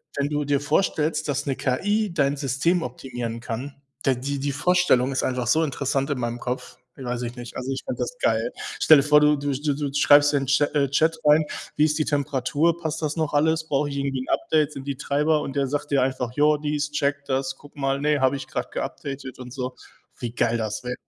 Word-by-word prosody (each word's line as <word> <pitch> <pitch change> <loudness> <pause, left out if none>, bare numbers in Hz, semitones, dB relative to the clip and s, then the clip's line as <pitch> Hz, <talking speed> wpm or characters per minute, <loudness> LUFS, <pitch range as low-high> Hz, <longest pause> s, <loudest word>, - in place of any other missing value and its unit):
wenn 140 0 0
du 150 0 -1
dir 140 -1 +2
vorstellst, 155 0 0
dass 145 +1 -1
'ne 135 -2 -1
KI 205 +9 0
dein 140 -3 +2
System 150 +6 +1
optimieren 120 -2 -5
kann, 125 +5 -5 0.3
der 135 -1 +3
die 140 +3 -3
die 140 +1 -1
Vorstellung 150 -5 +3
ist 130 - 0
einfach 125 -2 -1
so 160 +5 +3
interessant 140 -1 -1
in 140 -3 -1
meinem 120 0 -3
Kopf. 125 +1 -5 0.3
Weiß 125 -1 -3
ich 120 +1 -4
nicht. 120 -1 -8
Also, 130 +1 -4
ich 135 - -3
fände - - -4
das - - -3
geil. - - +1 0.3
Stell 155 - +7
dir 140 - +3
vor, 150 0 +5
du 150 0 +4
du 140 0 -2
du 145 +2 -1
du 145 -1 -3
schreibst 145 0 +6
in 140 - +2
den - - -6
Cha 145 +1 +4
äh, 140 -2 +2
Chat 160 +4 +2
rein: 150 +1 +5 0.3
„Wie 150 - +5
ist 150 0 +1
die - - +3
Temperatur? 145 +3 +1
Passt 160 -1 -4
das 150 0 -1
noch 155 -3 -1
alles? 160 +2 +2
Brauche 145 +1 +1
ich 140 - -5
irgendwie 140 -1 -1
'n - - -7
Update? 155 -1 +1
Sind 135 -1 -8
die 140 -2 -3
Treiber?“ 150 +3 +1
Und 135 0 -5
der 140 -1 +1
sagt 145 +1 -3
dir 140 - +3
einfach: 130 -2 -1
„Jo, 150 +1 +3
dies, 150 0 -2
check 140 -1 0
das, 135 -1 -1
guck 145 0 -17
mal. 135 0 0
Ne, 150 0 +2
habe 130 +1 +3
ich 135 -1 -6
grad - - -4
geupdatet 135 -2 -5
und 125 -1 -9
so.“ 125 -1 -4 0.4
Wie 120 -2 -4
geil 120 -1 +1
das 110 +1 -3
wä 125 0 -3
140 Hz, 235 wpm, -24 LUFS, 130-150 Hz, 0.4 s, Stell